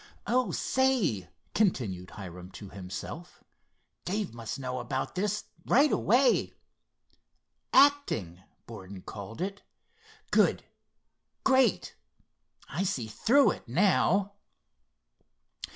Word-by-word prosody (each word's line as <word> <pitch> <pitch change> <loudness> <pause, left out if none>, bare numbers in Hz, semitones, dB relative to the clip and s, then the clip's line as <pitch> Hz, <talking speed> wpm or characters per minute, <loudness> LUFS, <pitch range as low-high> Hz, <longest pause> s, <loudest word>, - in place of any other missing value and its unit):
"Oh, 250 +1 +1
say," 205 - +1 0.2
continued 105 - 0
Hiram 90 -2 -9
to 100 - -9
himself, 100 - -8 0.6
"Dave 200 - -2
must 115 0 -5
know 130 -1 -4
about - - -3
this 210 +3 -1 0.2
right 280 +4 +5
away. 250 +5 +3 1.2
'Acting,' 270 - +3 0.2
Borden 95 -4 -10
called 105 - -8
it. 195 +2 -3 0.7
Good! - - +3 0.8
Great! 265 -1 +3 0.7
I - - -3
see 180 - -1
through 265 - +3
it - - -8
now!" 195 - +2
175 Hz, 90 wpm, -29 LUFS, -, 1.2 s, right